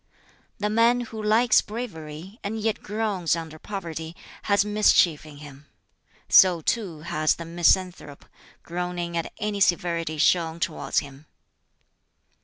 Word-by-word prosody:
"The 210 0 -2
man 230 +2 +3
who 225 -2 -7
likes 220 +2 +4
bravery, 190 - -8
and 220 +2 -3
yet 220 0 -1
groans 205 -6 -1
under 160 -2 -7
poverty, 165 -5 -6 0.3
has 200 0 +3
mischief 205 -7 +3
in 145 -1 -12
him. 145 -1 -13 0.6
So, 180 -3 +6
too, 175 -4 -2
has 155 -1 0
the 170 - -8
misanthrope, 170 -3 0 0.4
groaning 175 0 -4
at 165 - -3
any 210 -1 -3
severity 170 -4 0
shown 165 +1 +2
towards - - -1
him. 140 +1 -13
175 Hz, 125 wpm, -25 LUFS, 160-210 Hz, 0.6 s, So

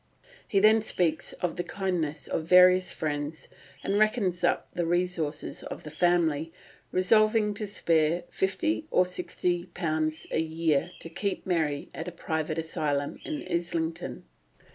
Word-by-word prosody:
He 200 - +2
then 215 +2 +6
speaks 175 -6 0
of 180 -2 -3
the 175 - -1
kindness 170 -8 -2
of - - -2
various 180 +1 +6
friends, 145 -1 -3 0.4
and 200 +1 +1
reckons 215 -5 +1
up - - +1
the 175 -1 -1
resources 175 -4 -1
of - - -7
the 150 - -8
family, 165 -1 +1 0.4
resolving 215 +3 +4
to 210 +1 -4
spare 165 -3 +1
£50 200 - 0
or 180 - +4
£60 175 -3 -2
a - - +1
year 160 -1 0
to - - -6
keep 200 +3 -3
Mary 160 -6 -1
at - - -6
a - - -4
private 160 -2 -3
asylum 145 -3 -2
at 305 -1 -5
Islington. 165 -5 -2
175 Hz, 140 wpm, -28 LUFS, 155-185 Hz, 0.4 s, then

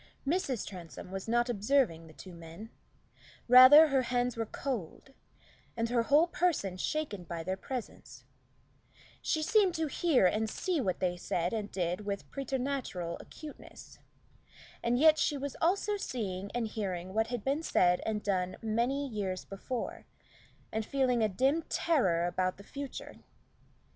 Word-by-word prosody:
Mrs. 280 - 0
Transome 180 -1 -9
was 195 +1 -5
not 240 +1 +2
observing 215 -7 +1
the 160 - -14
two 185 +3 -11
men; 170 +6 -10 0.8
rather, 255 +6 +9
her 270 -1 +3
hands 245 -1 0
were 225 -1 -3
cold, 255 - -5 0.6
and 230 0 0
her 240 -1 +2
whole 290 +7 +4
person 335 - 0
shaken 215 -2 -3
by 170 -1 -5
their 185 +3 -2
presence; 245 +4 -7 1.0
she 310 -2 0
seemed 390 -1 +3
to 320 - 0
hear 300 - +2
and 215 +4 +1
see 350 +3 -1
what 185 -7 -2
they 180 -1 0
said 175 +1 -2
and 210 -2 -3
did 180 +1 -2
with 200 -1 -4
preternatural 260 -10 -3
acuteness, 305 -1 -12 0.8
and 235 +1 +1
yet 310 +2 +6
she 290 - +1
was 280 0 -5
also 400 +4 +1
seeing 200 - -4
and 230 -2 -1
hearing 185 -4 -4
what 220 +1 +1
had 240 -3 -4
been 280 +3 0
said 180 - +3
and 215 -1 -2
done 185 -2 -1
many 240 +6 0
years 195 -6 -3
before, 230 +5 -5 0.6
and 220 0 -1
feeling 255 -1 +1
a 215 - +3
dim 265 - +1
terror 190 - +2
about 185 +1 -1
the 200 - -12
future. 280 +4 -7
230 Hz, 150 wpm, -31 LUFS, 185-275 Hz, 1.0 s, rather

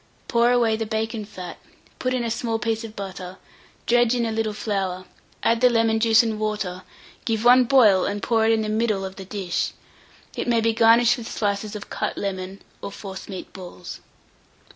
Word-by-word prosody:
Pour 235 0 +3
away 235 -3 +3
the 220 0 -3
bacon 220 0 -2
fat, 180 -4 -9 0.4
put 255 - -1
in 255 -1 0
a 230 - -2
small 230 0 -1
piece 225 0 -2
of 220 -1 -9
butter, 190 -2 -7 0.5
dredge 240 0 +3
in 240 -1 0
a 225 - -1
little 220 -1 -1
flour, 195 -3 -3 0.4
add 230 +1 +2
the 250 - +6
lemon 225 -1 +2
juice 225 0 +5
and 220 -2 -2
water, 210 -4 -2 0.4
give 225 0 -1
one 250 +1 +7
boil, 220 -8 +5
and 205 0 -3
pour 225 -2 +2
it 225 - +4
in 220 -1 +2
the - - -3
middle 215 -2 0
of 190 0 -8
the 190 - -8
dish. 190 -2 -2 0.6
It - - -3
may 235 -1 +3
be 225 0 +2
garnished 230 +2 +5
with 230 - -7
slices 205 0 -2
of 205 - -8
cut - - -3
lemon, 190 -1 -5 0.2
or - - -6
forcemeat 195 -1 -8
balls. 180 -1 -9
220 Hz, 190 wpm, -23 LUFS, 200-230 Hz, 0.6 s, one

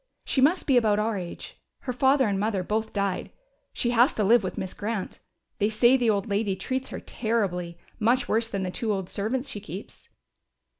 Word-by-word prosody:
She 265 - +1
must 325 +7 +3
be 270 -4 +4
about 215 -3 +3
our 215 +1 0
age. 180 -3 -7 0.2
Her 250 - -3
father 265 0 +3
and 200 -2 0
mother 205 -2 0
both 220 +3 -2
died, 200 -2 -1
so - - -27 0.4
she 240 - 0
has 245 +3 +4
to 215 - +1
live 225 +2 +5
with 185 - -4
Miss 185 - -4
Grant. 210 -1 -4 0.4
They 205 - +2
say 240 +4 +5
the 245 -3 +2
old 205 +1 +1
lady 200 -1 0
treats 260 +7 -3
her - - -6
terribly 185 -7 -2 0.2
much 245 +3 +2
worse 225 +1 +1
than 200 -3 -3
the 180 - -2
two 220 +3 -2
old 190 -3 -3
servants 245 +7 -2
she 210 - -4
keeps." 190 -1 -10
215 Hz, 205 wpm, -26 LUFS, 200-245 Hz, 0.4 s, live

